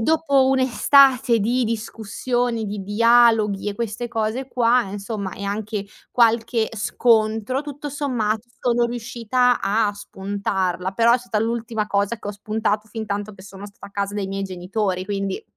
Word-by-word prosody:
dopo 280 Hz, 0 st, +3 dB
un'estate 265 Hz, -1 st, +4 dB
di 240 Hz, +4 st, +1 dB
discussioni, 230 Hz, +1 st, -2 dB
di 205 Hz, 0 st, -4 dB
dialoghi 220 Hz, -1 st, +3 dB
e 205 Hz, -, -4 dB
queste 235 Hz, +1 st, -4 dB
cose 225 Hz, +4 st, -2 dB
qua 245 Hz, -1 st, +3 dB
insomma, 200 Hz, -1 st, -5 dB
e 200 Hz, -, -7 dB
anche 205 Hz, 0 st, -3 dB, 0.3 s
qualche 230 Hz, -1 st, +2 dB
scontro, 220 Hz, +2 st, +1 dB
tutto 290 Hz, 0 st, -7 dB
sommato 240 Hz, -6 st, -2 dB
sono 240 Hz, -1 st, +2 dB
riuscita 245 Hz, +1 st, 0 dB
a 210 Hz, +1 st, +1 dB
spuntarla. 190 Hz, -2 st, -3 dB
Però 230 Hz, +4 st, +4 dB
è 250 Hz, -, +4 dB
stata 240 Hz, -3 st, -3 dB
l'ultima 225 Hz, -1 st, -2 dB
cosa 200 Hz, +2 st, 0 dB
che 210 Hz, -, -10 dB
ho -, -, -1 dB
spuntato, 215 Hz, +1 st, -2 dB
fintanto 210 Hz, -2 st, -4 dB
che 185 Hz, -, -14 dB
sono 195 Hz, +1 st, -10 dB
stata 200 Hz, 0 st, -13 dB
a -, -, -15 dB
casa 200 Hz, 0 st, -3 dB
dai 205 Hz, -2 st, -2 dB
miei 195 Hz, 0 st, -3 dB
genitori, 185 Hz, +1 st, -2 dB
quindi 195 Hz, -1 st, -3 dB
220 Hz, 150 wpm, -22 LUFS, 200-240 Hz, 0.3 s, un'estate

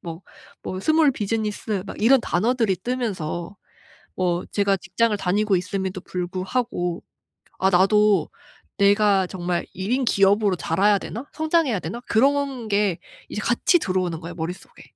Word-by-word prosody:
뭐, 165 Hz, +1 st, -8 dB, 0.4 s
뭐 185 Hz, -, -5 dB
스몰 310 Hz, +6 st, +3 dB
비즈니스 210 Hz, -3 st, -2 dB
막 -, -, -8 dB
이런 245 Hz, +4 st, +5 dB
단어들이 225 Hz, 0 st, +1 dB
뜨면서 195 Hz, -6 st, -4 dB, 0.6 s
뭐 175 Hz, -1 st, 0 dB
제가 200 Hz, -1 st, +2 dB
직장을 210 Hz, +5 st, 0 dB
다니고 200 Hz, +1 st, +1 dB
있음에도 190 Hz, +1 st, -3 dB
불구하고 185 Hz, 0 st, -3 dB, 0.6 s
'아 190 Hz, -, +3 dB
나도 195 Hz, -1 st, +3 dB, 0.5 s
내가 200 Hz, -1 st, +4 dB
정말 175 Hz, -2 st, -3 dB
1 190 Hz, +5 st, -4 dB
인 265 Hz, 0 st, +1 dB
기업으로 200 Hz, -2 st, +3 dB
자라야 200 Hz, +7 st, +2 dB
되나? 230 Hz, +6 st, -7 dB
성장해야 315 Hz, -, +1 dB
되나?' 195 Hz, +10 st, -6 dB
그런 270 Hz, 0 st, +1 dB
게 200 Hz, -4 st, +1 dB, 0.3 s
이제 -, -, -4 dB
같이 240 Hz, -, +2 dB
들어오는 185 Hz, -, -1 dB
거예요 170 Hz, +1 st, -8 dB
머릿속에. 175 Hz, +2 st, -7 dB
200 Hz, 305 characters per minute, -23 LUFS, 180-230 Hz, 0.6 s, 이런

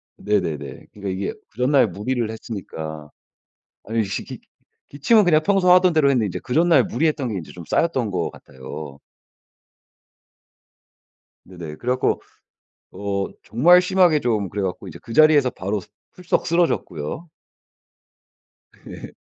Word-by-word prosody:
네네네. 80 Hz, -10 st, -3 dB
그러니까 100 Hz, -2 st, -6 dB
이게 95 Hz, +1 st, -3 dB, 0.2 s
그 110 Hz, -, -31 dB
전날 130 Hz, -1 st, +3 dB
무리를 110 Hz, +5 st, -3 dB
했으니까. 80 Hz, -9 st, -7 dB, 0.8 s
아니 110 Hz, 0 st, -1 dB
지 95 Hz, -, -4 dB
기 -, -, -9 dB, 0.5 s
기침은 205 Hz, +10 st, +3 dB
그냥 155 Hz, -3 st, +4 dB
평소 195 Hz, -3 st, +4 dB
하던 180 Hz, -1 st, +5 dB
대로 155 Hz, -3 st, +3 dB
했는데 120 Hz, -6 st, +2 dB
이제 90 Hz, -, -4 dB
그 125 Hz, -, -4 dB
전날 165 Hz, -6 st, +4 dB
무리했던 145 Hz, 0 st, -1 dB
게 110 Hz, -, -4 dB
인제 85 Hz, -, -7 dB
좀 85 Hz, -2 st, -10 dB
쌓였던 130 Hz, -10 st, 0 dB
것 90 Hz, -3 st, -2 dB
같아요. 70 Hz, +2 st, -10 dB, 2.5 s
네네. 85 Hz, -5 st, -9 dB
그래 125 Hz, -, -2 dB
갖고 130 Hz, 0 st, 0 dB, 0.7 s
어 100 Hz, -1 st, -3 dB, 0.2 s
정말 175 Hz, +10 st, +5 dB
심하게 180 Hz, -4 st, +3 dB
좀 110 Hz, -7 st, -1 dB
그래 100 Hz, 0 st, -4 dB
갖고 95 Hz, 0 st, -4 dB
이제 85 Hz, -1 st, -10 dB
그 115 Hz, -, -9 dB
자리에서 155 Hz, -3 st, +5 dB
바로 100 Hz, +1 st, -3 dB
스 -, -, -15 dB, 0.2 s
풀썩 180 Hz, -1 st, -2 dB
쓰러졌고요. 165 Hz, -, -1 dB, 1.6 s
예. -, -, -9 dB
115 Hz, 285 characters per minute, -22 LUFS, 95-155 Hz, 2.5 s, 하던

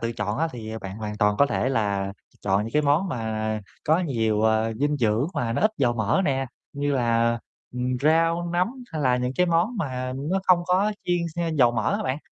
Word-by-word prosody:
tự 115 Hz, 0 st, -2 dB
chọn 105 Hz, +3 st, -3 dB
thì 110 Hz, -2 st, -7 dB
bạn 95 Hz, +1 st, -7 dB
hoàn 105 Hz, -1 st, -5 dB
toàn 105 Hz, -1 st, +3 dB
có 140 Hz, -, +6 dB
thể 130 Hz, -, 0 dB
là 100 Hz, -6 st, 0 dB, 0.3 s
chọn 100 Hz, +1 st, +2 dB
những 115 Hz, -, -6 dB
cái 150 Hz, 0 st, +3 dB
món 150 Hz, +7 st, +2 dB
mà 110 Hz, -4 st, -2 dB, 0.2 s
có 160 Hz, +3 st, +3 dB
nhiều, 110 Hz, -9 st, 0 dB
ờ, 110 Hz, 0 st, +2 dB
dinh 145 Hz, +5 st, 0 dB
dưỡng 115 Hz, +2 st, +1 dB
mà 115 Hz, -2 st, -1 dB
nó -, -, -1 dB
ít 215 Hz, -, +4 dB
dầu 120 Hz, -3 st, +3 dB
mỡ 115 Hz, -, +1 dB
nè, 135 Hz, -3 st, 0 dB, 0.3 s
như 145 Hz, 0 st, -1 dB
là, 115 Hz, -1 st, +2 dB, 0.3 s
ừm, 125 Hz, +1 st, -1 dB
rau, 165 Hz, +3 st, +2 dB
nấm 180 Hz, +3 st, +2 dB, 0.2 s
hay 155 Hz, -, -2 dB
là 125 Hz, -2 st, +3 dB
những 125 Hz, 0 st, -1 dB
cái 180 Hz, -, +3 dB
món 175 Hz, +8 st, +1 dB
mà 130 Hz, -7 st, -3 dB
nó 155 Hz, +8 st, -1 dB
không 180 Hz, -2 st, +4 dB
có 195 Hz, +4 st, +2 dB
chiên, 175 Hz, -, +1 dB, 0.2 s
ha, 170 Hz, -1 st, 0 dB
dầu 135 Hz, -7 st, +4 dB
mỡ 110 Hz, -3 st, 0 dB
á -, -, -3 dB
bạn, 130 Hz, +2 st, -1 dB
125 Hz, 220 wpm, -25 LUFS, 110-155 Hz, 0.3 s, có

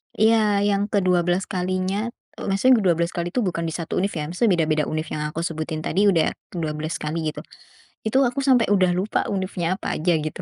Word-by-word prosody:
Iya, 215 Hz, -2 st, +3 dB
yang 205 Hz, 0 st, +1 dB
ke-12 180 Hz, -2 st, +2 dB
kalinya, 185 Hz, +3 st, -1 dB, 0.3 s
e -, -, -14 dB
maksudnya 225 Hz, +5 st, +4 dB
ke-12 170 Hz, -1 st, +2 dB
kali 170 Hz, 0 st, -2 dB
itu, 250 Hz, -, -1 dB
bukan 170 Hz, -3 st, -2 dB
di -, -, -3 dB
1 165 Hz, -2 st, -4 dB
univ 200 Hz, +2 st, 0 dB
ya, 150 Hz, -1 st, -3 dB
maksudnya 200 Hz, +4 st, +2 dB
beda-beda 155 Hz, -1 st, +2 dB
univ 155 Hz, 0 st, -2 dB
yang 150 Hz, -, -2 dB
aku 155 Hz, +2 st, -5 dB
sebutin 160 Hz, -1 st, -3 dB
tadi 195 Hz, +5 st, +1 dB
udah 165 Hz, -5 st, +3 dB, 0.2 s
ke-12 155 Hz, -1 st, -3 dB
kali, 155 Hz, +1 st, -3 dB
gitu. -, -, -8 dB, 0.6 s
Itu, 260 Hz, +5 st, +3 dB
aku 250 Hz, +3 st, -1 dB
sampai 250 Hz, -5 st, +4 dB
udah 185 Hz, -2 st, +4 dB
lupa 190 Hz, +4 st, -1 dB
univnya 185 Hz, -3 st, -1 dB
apa -, -, -3 dB
aja, 170 Hz, +1 st, +2 dB
gitu. 155 Hz, 0 st, -4 dB
180 Hz, 195 wpm, -23 LUFS, 160-200 Hz, 0.6 s, maksudnya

